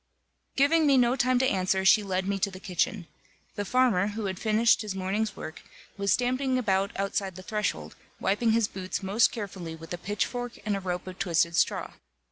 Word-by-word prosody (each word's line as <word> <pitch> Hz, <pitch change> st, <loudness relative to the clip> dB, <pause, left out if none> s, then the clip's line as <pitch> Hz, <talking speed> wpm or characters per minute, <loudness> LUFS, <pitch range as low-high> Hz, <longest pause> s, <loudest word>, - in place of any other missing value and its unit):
Giving 300 Hz, +3 st, +4 dB
me 275 Hz, -2 st, +5 dB
no 245 Hz, 0 st, +4 dB
time 255 Hz, 0 st, +2 dB
to 260 Hz, +1 st, +3 dB
answer, 190 Hz, -2 st, +1 dB
she 190 Hz, +3 st, +6 dB
led 190 Hz, -1 st, -2 dB
me 200 Hz, 0 st, -1 dB
to 200 Hz, -, +1 dB
the 185 Hz, -1 st, -10 dB
kitchen. 185 Hz, +1 st, -1 dB, 0.5 s
The 205 Hz, -, -4 dB
farmer, 235 Hz, -6 st, +3 dB
who 210 Hz, +1 st, -4 dB
had 190 Hz, -1 st, -3 dB
finished 220 Hz, +1 st, +3 dB
his 210 Hz, -3 st, -4 dB
morning's 200 Hz, +3 st, -1 dB
work, 155 Hz, -, -8 dB, 0.3 s
was 200 Hz, -1 st, 0 dB
stamping 255 Hz, +1 st, +1 dB
about 195 Hz, -5 st, +1 dB
outside 195 Hz, -1 st, -2 dB
the 185 Hz, -, -9 dB
threshold, 210 Hz, +2 st, -3 dB, 0.2 s
wiping 220 Hz, +3 st, +1 dB
his 225 Hz, -2 st, +2 dB
boots 190 Hz, 0 st, -5 dB
most 200 Hz, +5 st, +3 dB
carefully 190 Hz, -7 st, -6 dB
with 165 Hz, +1 st, -9 dB
a 175 Hz, -, -5 dB
pitchfork 235 Hz, +5 st, -3 dB
and 210 Hz, -1 st, 0 dB
a -, -, -2 dB
rope 180 Hz, -1 st, -4 dB
of 185 Hz, 0 st, -9 dB
twisted 170 Hz, -2 st, +1 dB
straw. -, -, +1 dB
200 Hz, 195 wpm, -27 LUFS, 185-230 Hz, 0.5 s, she